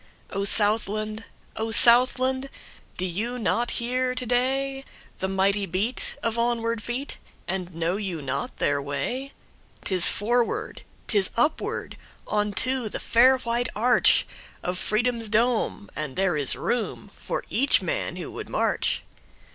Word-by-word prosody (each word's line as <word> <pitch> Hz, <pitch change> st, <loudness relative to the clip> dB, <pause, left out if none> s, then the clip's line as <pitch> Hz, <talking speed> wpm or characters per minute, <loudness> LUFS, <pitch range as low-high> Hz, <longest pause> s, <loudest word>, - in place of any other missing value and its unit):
O 200 Hz, 0 st, -2 dB
Southland! 215 Hz, +1 st, +2 dB, 0.3 s
O 220 Hz, +1 st, -3 dB
Southland! 255 Hz, +4 st, +5 dB, 0.5 s
Do 185 Hz, -, -1 dB
you 215 Hz, +8 st, -3 dB
not 240 Hz, +1 st, 0 dB
hear 250 Hz, +1 st, -1 dB
to 255 Hz, -, -2 dB
dayThe 265 Hz, -4 st, -3 dB
mighty 195 Hz, +1 st, +1 dB
beat 200 Hz, +8 st, -1 dB
of 230 Hz, 0 st, -1 dB
onward 230 Hz, -1 st, -1 dB
feet, 245 Hz, +6 st, -5 dB, 0.3 s
And 180 Hz, -2 st, -4 dB
know 170 Hz, +3 st, -1 dB
you 190 Hz, -6 st, -4 dB
not 140 Hz, -1 st, -4 dB
their 145 Hz, 0 st, 0 dB
way?'Tis 185 Hz, -, 0 dB
forward, 240 Hz, -, -1 dB, 0.2 s
'tis 200 Hz, -4 st, +3 dB
upward, 295 Hz, +7 st, -1 dB, 0.3 s
On 210 Hz, 0 st, -1 dB
to 255 Hz, +2 st, 0 dB
the -, -, -5 dB
fair 255 Hz, +3 st, +4 dB
white 240 Hz, -1 st, -2 dB
archOf 240 Hz, +3 st, +4 dB, 0.5 s
Freedom's 230 Hz, +3 st, -1 dB
dome, 225 Hz, -2 st, 0 dB
and 150 Hz, -4 st, -5 dB
there 190 Hz, -3 st, +1 dB
is 145 Hz, -3 st, +5 dB
roomFor 240 Hz, -2 st, -4 dB
each 275 Hz, +5 st, +4 dB
man -, -, -3 dB
who -, -, -7 dB
would -, -, -8 dB
march. -, -, 0 dB
225 Hz, 125 wpm, -25 LUFS, 195-250 Hz, 0.5 s, Southland